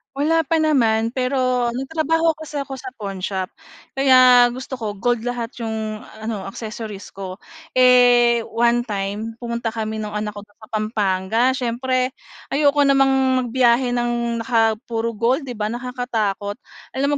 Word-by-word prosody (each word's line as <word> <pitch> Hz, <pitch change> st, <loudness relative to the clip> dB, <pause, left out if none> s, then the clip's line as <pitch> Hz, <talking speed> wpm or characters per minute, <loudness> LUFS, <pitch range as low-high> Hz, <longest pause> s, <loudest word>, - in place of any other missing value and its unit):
Wala 320 Hz, +3 st, +2 dB
pa 320 Hz, +3 st, +1 dB
naman, 230 Hz, -7 st, +2 dB
pero 255 Hz, -1 st, 0 dB
nagtrabaho 320 Hz, +4 st, 0 dB
ako 315 Hz, -, -9 dB
sa 290 Hz, -2 st, -4 dB
'ko 270 Hz, -1 st, -6 dB
sa 385 Hz, +6 st, -8 dB
pawnshop, 190 Hz, -1 st, -3 dB, 0.5 s
kaya 255 Hz, -2 st, +7 dB
gusto 260 Hz, +1 st, -6 dB
ko 220 Hz, -3 st, -4 dB
gold 235 Hz, +3 st, -1 dB
lahat 240 Hz, -2 st, -3 dB
yung 220 Hz, -2 st, -4 dB, 0.2 s
ano, 220 Hz, -3 st, -4 dB
accessories 215 Hz, 0 st, -7 dB
ko. 190 Hz, 0 st, -8 dB, 0.3 s
Eh, 245 Hz, -2 st, +5 dB
one 235 Hz, +1 st, +1 dB
time, 205 Hz, +1 st, -3 dB
pumunta 235 Hz, -1 st, -3 dB
kami 220 Hz, -1 st, -3 dB
no'ng 210 Hz, -1 st, -5 dB
anak 210 Hz, 0 st, -4 dB
ko 205 Hz, -, -9 dB
do'n 205 Hz, -, -30 dB
sa 215 Hz, -, -14 dB
Pampanga. 215 Hz, -1 st, 0 dB
Siyempre 255 Hz, +1 st, -1 dB, 0.4 s
ayoko 285 Hz, 0 st, +3 dB
namang 270 Hz, -1 st, +4 dB, 0.3 s
magbiyahe 245 Hz, 0 st, +2 dB
ng 240 Hz, -1 st, -1 dB
naka 225 Hz, -3 st, +2 dB
puro 230 Hz, -1 st, -3 dB
gold, 255 Hz, +5 st, 0 dB
'di 240 Hz, -, -6 dB
ba, 210 Hz, -, -1 dB
nakakatakot? 240 Hz, -4 st, -3 dB, 0.3 s
Alam 280 Hz, +2 st, 0 dB
240 Hz, 145 wpm, -21 LUFS, 220-260 Hz, 0.5 s, kaya